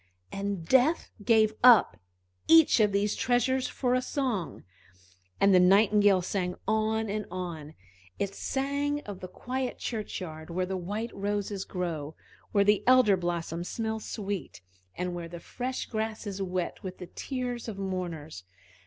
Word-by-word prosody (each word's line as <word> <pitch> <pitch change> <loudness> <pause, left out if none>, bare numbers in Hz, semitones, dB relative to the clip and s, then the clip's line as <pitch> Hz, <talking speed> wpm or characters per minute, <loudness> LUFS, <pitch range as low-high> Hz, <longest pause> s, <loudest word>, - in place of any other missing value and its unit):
And 195 -3 -3
Death 265 - +3
gave 220 0 +4
up 240 -6 +7 0.5
each 325 -6 +7
of 210 -2 +4
these 200 +1 +1
treasures 255 +1 +1
for 250 -2 -1
a 255 - +2
song. 250 - -2 0.8
And 200 0 +5
the 180 - +7
Nightingale 200 0 +5
sang 180 -1 -2
on 220 +1 +1
and 210 0 -3
on; 170 -4 -6 0.4
it 200 -1 -2
sang 280 +5 -1
of 205 -7 -8
the 185 - -7
quiet 255 +7 -4
churchyard 180 -8 -5
where 180 +2 -1
the 190 +1 -3
white 205 +6 -4
roses 205 -1 -2
grow, 160 -5 -4 0.4
where 200 - +4
the 210 0 +3
elder 255 -6 +6
blossom 175 -2 -3
smells 220 +3 -3
sweet, 200 - -5 0.3
and 180 0 -3
where 170 -1 -5
the 170 0 -8
fresh 255 +8 -4
grass 220 -1 -3
is 200 -1 -5
wet 185 -2 -3
with 185 -3 -7
the 180 - -7
tears 245 +3 -5
of 215 -3 -5
mourners. 175 - -5
200 Hz, 150 wpm, -28 LUFS, 180-230 Hz, 0.8 s, up